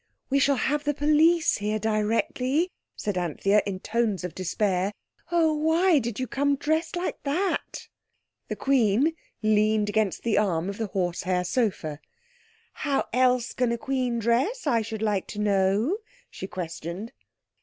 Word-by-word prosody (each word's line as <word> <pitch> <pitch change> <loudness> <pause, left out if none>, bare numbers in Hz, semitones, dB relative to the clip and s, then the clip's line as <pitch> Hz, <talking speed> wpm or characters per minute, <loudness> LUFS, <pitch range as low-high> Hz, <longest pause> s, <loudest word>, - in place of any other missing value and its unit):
"We 275 - +4
shall 280 +1 +3
have 290 +3 0
the 295 -1 0
police 310 +3 +3
here 210 +1 -1
directly," 230 - 0 0.2
said 205 -3 -2
Anthea 195 +5 +2
in 200 - -2
the - - -8
tones 220 -4 0
of 180 -3 -4
despair. 190 +1 0 0.4
"Oh, 330 -2 +3
why 320 +2 +3
did 235 -2 -4
you 255 - -1
come 280 +4 +1
dressed 315 +4 -1
like 355 +1 -3
that?" 335 +7 -2 0.6
The - - -3
Queen 265 +2 +2 0.3
leaned 215 0 +3
against 210 -2 0
the 230 -3 +2
arm 180 -3 0
of 200 - -6
the 220 - -1
horse 180 -3 -2
hair 180 0 0
sofa. 180 - -1 0.7
"How 285 -2 -1
else 250 -1 +2
can 245 -1 +1
a 235 - 0
queen 255 -1 -1
dress 245 - 0
I 235 -6 +2
should 220 0 -5
like 205 -3 0
to 210 - -7
know?" 205 - +2 0.3
she 190 - -7
questioned. 180 +3 -6
225 Hz, 155 wpm, -26 LUFS, 200-285 Hz, 0.7 s, We